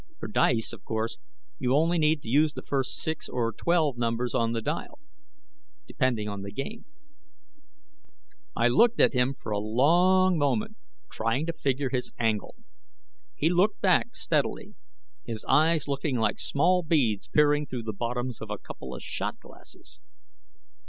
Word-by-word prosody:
For - - -6
dice, 120 - +1
of 110 - -11
course, 110 0 -3 0.4
you 130 -2 +1
only 165 +3 +2
need 155 -1 +2
to - - -11
use 145 +5 +3
the - - -8
first 135 -2 -2
six 160 0 -3
or 115 -2 -1
twelve 155 -3 +1
numbers 120 +1 -1
on 115 0 +1
the 115 - -1
dial, 150 - -4 0.9
depending 120 -6 -1
on 100 -1 -5
the 100 0 -7
game." 215 - -6 1.7
I 115 - +3
looked 225 - +4
at - - +5
him 125 +1 +1
for 110 - -8
a 105 - 0
long 175 - +3
moment, 215 +10 0 0.4
trying 115 +7 -1
to 165 - -2
figure 135 -2 -1
his 125 -2 -2
angle. 110 -3 -1 0.8
He 155 - +1
looked 190 +4 +2
back - - +2
steadily, - - -1 0.5
his 110 -2 -5
eyes 155 +2 +3
looking 140 -1 -1
like 115 - 0
small 180 +6 +2
beads 140 - +1
peering 150 0 +3
through 125 -2 -5
the 110 -1 -4
bottoms 120 +3 -3
of - - -7
a - - -3
couple - - -9
of - - -9
shot - - -4
glasses. - - -15
135 Hz, 160 wpm, -27 LUFS, 115-160 Hz, 1.7 s, at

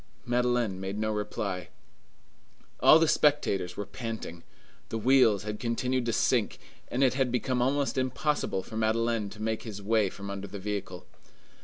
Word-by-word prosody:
Madeleine 120 -5 +1
made 95 +1 -4
no 110 0 0
reply. 105 -3 -3 1.1
All 155 - +8
the 165 0 +3
spectators 145 -13 +2
were 105 - -3
panting. 110 -9 -6 0.5
The 115 - -2
wheels 115 -3 +4
had 105 0 -5
continued 125 +1 -1
to - - +2
sink, - - +1 0.3
and 130 +3 0
it 130 - +4
had 130 -2 0
become 125 0 0
almost 135 +1 +1
impossible 130 -5 -1
for 110 - -10
Madeleine 115 -1 +1
to 105 - -12
make 110 0 -1
his 105 -3 -7
way 105 0 +2
from 100 +1 -7
under 100 0 -5
the 100 +2 -7
vehicle. 100 -2 -5
110 Hz, 160 wpm, -29 LUFS, 100-125 Hz, 1.1 s, All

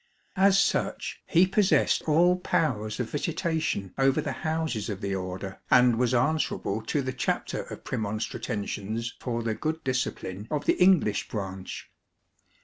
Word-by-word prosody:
As 195 0 +5
such 195 - 0
he 175 +1 +5
possessed 195 +1 +3
all 170 +4 +5
powers 125 -12 -1
of 120 -2 -3
visitation 160 - -1
over 135 0 +3
the - - -2
houses 155 -9 -1
of 100 -3 -4
the 100 -2 -2
Order, 95 0 -5
and 125 -2 +5
was 125 -1 +2
answerable 125 -5 0
to 145 - 0
the 130 0 -3
Chapter 125 -1 -1
of - - -9
Premonstratensians 110 +1 -3
for 120 -2 -3
the 115 -1 0
good 155 +7 -3
discipline 110 -6 -3
of 150 -1 -2
the - - +2
English 180 - +4
branch. 95 -3 -6
125 Hz, 140 wpm, -27 LUFS, 105-160 Hz, -, As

